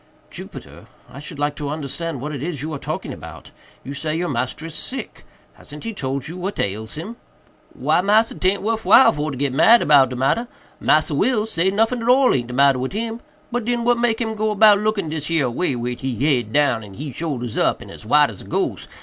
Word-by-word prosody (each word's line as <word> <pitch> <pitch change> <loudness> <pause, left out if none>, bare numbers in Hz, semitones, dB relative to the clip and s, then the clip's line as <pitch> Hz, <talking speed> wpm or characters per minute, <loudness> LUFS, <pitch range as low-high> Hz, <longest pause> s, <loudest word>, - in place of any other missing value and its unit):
"Jupiter, - - -10 0.2
I 125 +2 -11
should 150 +1 -9
like 145 0 -1
to 145 -2 -4
understand 150 0 -4
what 150 +2 -4
it 140 - -5
is 150 -3 -4
you 155 +1 -4
are 140 - -5
talking - - -5
about. - - -11 0.3
You 135 - -6
say 155 +2 -3
your 175 +1 -1
master 130 +4 -3
is 165 - -7
sick. 255 +12 -5 0.3
Hasn't 150 0 -12
he 230 - -4
told 135 -5 -4
you 170 +3 -7
what 190 +3 -4
ails 105 +3 -3
him?" 205 +10 -7 0.6
"Why, - - +2
massa, 215 +4 +3
'taint 190 +2 0
worf 225 +1 -1
while 215 +8 +7
for 150 +1 -3
to 140 - -5
git 140 -1 -1
mad 230 - +6
about 140 -3 +5
de 125 - -5
matter—Massa 155 - 0
Will 215 - +1
say 190 -4 +1
noffin 225 +4 +1
at 230 - -1
all 260 +1 +5
aint 120 -2 -1
de 125 - -7
matter 140 -1 +4
wid 130 +5 -3
him—but 230 +2 -5
den 240 +1 -1
what 240 0 +2
make 235 -2 +1
him 225 -2 -2
go 215 0 -1
about 210 -1 +6
looking 210 -5 -1
dis 150 -1 -4
here 160 -5 +1
way, 135 +1 -1
wid 120 0 -4
he 130 -2 -3
head 125 -7 +1
down 130 -4 +2
and 100 -3 -11
he 145 +1 -6
soldiers 125 -7 -4
up, - - +1
and - - -11
as - - -11
white - - +4
as - - -9
a - - -12
gose? - - -2
155 Hz, 225 wpm, -21 LUFS, 135-215 Hz, 0.6 s, while